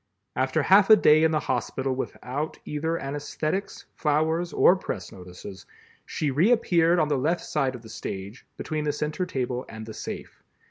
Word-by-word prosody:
After 130 +4 +1
half 195 +6 +5
a 220 - +11
day 155 -6 +5
in 160 - +5
the 155 -1 0
hospital 130 +2 -2
without 135 +3 -4
either 160 +3 -2
anesthetics, 145 +6 -4
flowers 160 +3 0
or 180 - +5
press 185 - -5
notices, 90 +1 -11 0.4
she 150 -3 -1
reappeared 175 - +3
on 155 -3 +2
the 145 -3 0
left 160 +6 0
side 135 -4 -1
of 120 - -10
the - - -11
stage, 100 0 -7
between 155 -1 -3
the 150 - 0
center 150 +5 -2
table 125 -5 -2
and 110 0 -8
the 110 - -8
safe. - - -8
150 Hz, 170 wpm, -26 LUFS, 130-165 Hz, 0.4 s, a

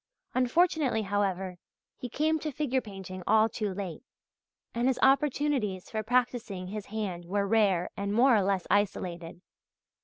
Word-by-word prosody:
Unfortunately, 255 -2 +2
however, 190 -2 -1 0.4
he 250 - -7
came 315 +5 +1
to 305 0 -3
figure 265 -2 0
painting 190 -3 -8
all 220 0 +5
too 215 -3 -3
late, 185 -4 -5 0.7
and 235 +2 0
his 265 - +2
opportunities 270 -8 +1
for 220 - -1
practising 230 -5 -1
his 210 0 -6
hand 200 -5 -4
were 200 +3 0
rare 195 -5 +3
and 200 0 -3
more 240 +4 +5
or 210 - +4
less 190 -1 0
isolated. 180 -4 -1
210 Hz, 145 wpm, -29 LUFS, 190-255 Hz, 0.7 s, all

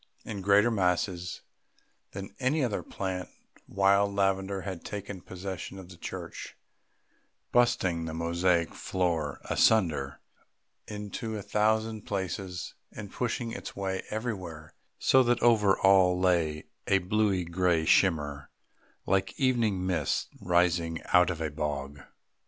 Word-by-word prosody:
In 100 -3 -5
greater 100 +4 +4
masses 90 -3 -1 0.7
than 95 0 -7
any 135 +3 +1
other 115 -5 -1
plant, 95 -2 -4 0.4
wild 100 +1 +3
lavender 95 0 0
had 95 -3 -6
taken 100 -2 -6
possession 95 +1 -7
of 95 -2 -10
the 90 - -11
church, - - -7 0.9
bursting 105 -9 +2
the 80 - -5
mosaic 85 +1 +1
floor 85 -6 -1
asunder 80 -11 +2 0.7
in 105 -1 -6
a 110 -3 -4
thousand 110 +1 0
places 95 -2 -4 0.2
and 100 -2 -8
pushing 120 -1 -2
its - - -7
way 95 -1 -2
everywhere, 95 -9 -5 0.2
so 130 - +5
that 120 -1 +2
over 105 -5 +5
all 95 -2 +5
lay 85 -5 +1 0.2
a 100 - +4
bluey 95 -1 +1
grey 85 -1 +1
shimmer 75 -6 +2 0.6
like 95 0 0
evening 115 -8 +1
mists 90 -2 0
rising 85 -2 +1
out 90 0 +6
of 85 -3 -3
a 80 -2 -2
bog. 75 -1 -4
95 Hz, 125 wpm, -29 LUFS, 85-105 Hz, 0.9 s, out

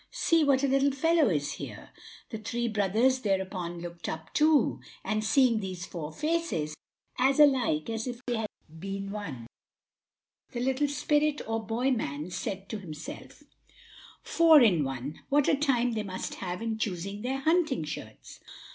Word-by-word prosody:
see 330 -1 +2
what 275 -2 +3
a - - +4
little 275 +1 +3
fellow 315 +1 +3
is 145 -5 0
here." - - -8 0.4
The 220 - -4
three 235 +1 -2
others 220 +6 +3
thereupon 190 -5 -2
looked 170 -1 -6
up, 160 +1 -7
too, 305 -1 +3 0.2
and 215 0 -1
seeing 235 0 +4
these 190 -2 -5
four 160 -5 -6
faces, 305 - -1 0.5
as 270 +3 +3
alike 255 - +4
as 225 +1 -3
if 245 -1 -5
they 245 -2 -1
had 220 -1 -2 0.3
been 195 +2 -5
one, 160 - -6 1.1
the 240 - -3
little 265 +3 +1
spirit 295 +1 +1
or 225 0 -1
boy 240 +5 0
man 155 - -2
said 195 +2 -4
to 220 - -4
himself: 160 -6 -9 0.8
"Four 330 -2 +6
in 185 -10 +4
one! 135 +2 -5
What 285 0 +3
a - - +4
time 260 -4 +1
they 220 -2 -1
must 185 -2 -5
have 180 +2 -4
in 225 -1 -2
choosing 200 0 -3
their 260 +3 -1
hunting 315 - +2
shirts!" 150 - -8
225 Hz, 160 wpm, -29 LUFS, 185-270 Hz, 1.1 s, Four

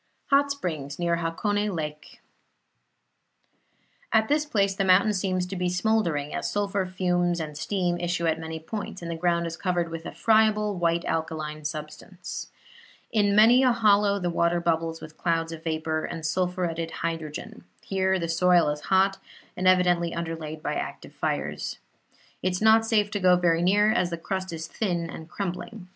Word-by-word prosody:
HOT 280 +1 +5
SPRINGS 155 - -4
NEAR 170 -1 +1
HAKONE 205 +5 -1
LAKE 150 -1 -6 1.9
At 220 -1 +3
this 300 +1 +2
place 200 -7 +1
the 195 - -1
mountain 195 +3 +4
seems 185 -2 0
to 185 +2 -6
be 180 -1 0
smouldering, 180 -6 0
as - - -2
sulphur 200 -2 -1
fumes 175 -1 0
and 155 -2 -5
steam 175 +1 -1
issue 175 0 -1
at 160 0 +1
many 160 0 -5
points, 190 +2 -6
and 170 - -4
the - - -3
ground 170 0 +1
is 165 0 -4
covered 175 -2 -1
with 165 0 -6
a - - -5
friable 215 -1 +3
white 170 -1 0
alkaline 155 -1 -3
substance. 155 +5 -6 0.6
In 205 -2 +2
many 230 +4 +7
a 255 -1 +5
hollow 205 -3 +3
the 180 -3 -2
water 170 +1 +2
bubbles 165 -1 -1
with 155 0 -11
clouds 165 -1 0
of 165 -1 -8
vapor 160 -1 -2
and 160 -1 -6
sulphuretted 175 -1 -1 0.2
hydrogen; 165 +7 -5 0.2
here 190 0 +1
the 170 -2 -2
soil 175 -1 +4
is 150 0 -3
hot 195 0 +3 0.4
and 185 +1 0
evidently 180 -2 +3
underlaid 160 -2 -5
by - - -1
active - - -5
fires. - - -3 0.6
It 185 - 0
is 180 - -2
not 220 +1 +5
safe 210 -2 +2
to 205 - -1
go 180 -1 +5
very 170 -2 +2
near, 205 +4 +4
as 185 -6 +1
the 170 - -4
crust 185 +2 -4
is 165 -1 -5
thin 170 -2 -2
and 160 +1 -9
crumbling. 180 +1 -5
175 Hz, 170 wpm, -26 LUFS, 165-200 Hz, 1.9 s, many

